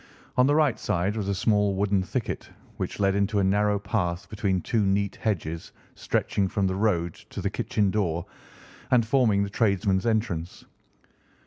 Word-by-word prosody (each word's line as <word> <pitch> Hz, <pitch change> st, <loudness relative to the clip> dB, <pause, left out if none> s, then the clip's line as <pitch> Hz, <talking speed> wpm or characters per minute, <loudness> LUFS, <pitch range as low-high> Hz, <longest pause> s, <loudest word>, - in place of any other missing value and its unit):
On 125 Hz, +1 st, +4 dB
the 145 Hz, -, +3 dB
right 150 Hz, -6 st, +3 dB
side 90 Hz, +4 st, 0 dB
was 105 Hz, -3 st, -2 dB
a 100 Hz, -, 0 dB
small 105 Hz, -1 st, +2 dB
wooden 100 Hz, 0 st, +1 dB
thicket, 95 Hz, -, -4 dB, 0.3 s
which -, -, -4 dB
led 100 Hz, -1 st, +3 dB
into 100 Hz, +1 st, +1 dB
a 100 Hz, -, +3 dB
narrow 105 Hz, +2 st, +2 dB
path 100 Hz, -3 st, -2 dB
between 100 Hz, -3 st, 0 dB
two 110 Hz, +4 st, 0 dB
neat 100 Hz, 0 st, +1 dB
hedges 85 Hz, -6 st, -3 dB, 0.2 s
stretching 100 Hz, -1 st, 0 dB
from 100 Hz, +1 st, 0 dB
the 95 Hz, -, +1 dB
road 85 Hz, -5 st, +1 dB, 0.2 s
to -, -, -6 dB
the -, -, -1 dB
kitchen 100 Hz, -3 st, 0 dB
door, 85 Hz, -5 st, -1 dB, 0.6 s
and 120 Hz, -3 st, +4 dB
forming 115 Hz, -5 st, +3 dB
the 100 Hz, -, -3 dB
tradesmen's 100 Hz, -1 st, +1 dB
entrance. 100 Hz, -7 st, -2 dB
100 Hz, 170 wpm, -26 LUFS, 95-110 Hz, 0.6 s, On